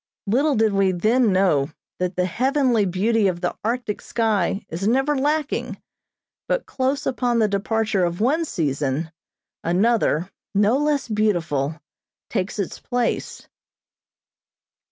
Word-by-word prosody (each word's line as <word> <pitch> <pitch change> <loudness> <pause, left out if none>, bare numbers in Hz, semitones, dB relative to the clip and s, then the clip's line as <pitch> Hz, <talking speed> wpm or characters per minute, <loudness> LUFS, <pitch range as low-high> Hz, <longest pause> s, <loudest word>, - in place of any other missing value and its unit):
Little 270 +8 +2
did 220 -1 +2
we 195 -1 +3
then 215 +6 +2
know 180 -7 +2 0.3
that 180 0 -1
the 180 - +1
heavenly 255 - +2
beauty 205 +4 +2
of 175 -2 -2
the 175 - -1
Arctic 230 -1 -2
sky 210 -4 0
is 175 +5 -3
never 270 +5 +2
lacking, 295 +2 -1 0.7
but - - 0
close 265 +1 -1
upon 245 -2 0
the 220 -2 +3
departure 210 0 0
of 175 0 -1
one 285 +9 +2
season, 150 - -2 0.5
another, 185 -1 +1 0.2
no 205 +4 +4
less 295 -2 0
beautiful, 170 - 0 0.5
takes 195 -2 -2
its 200 -4 -3
place. 245 -2 -2
210 Hz, 125 wpm, -22 LUFS, 180-245 Hz, 0.7 s, no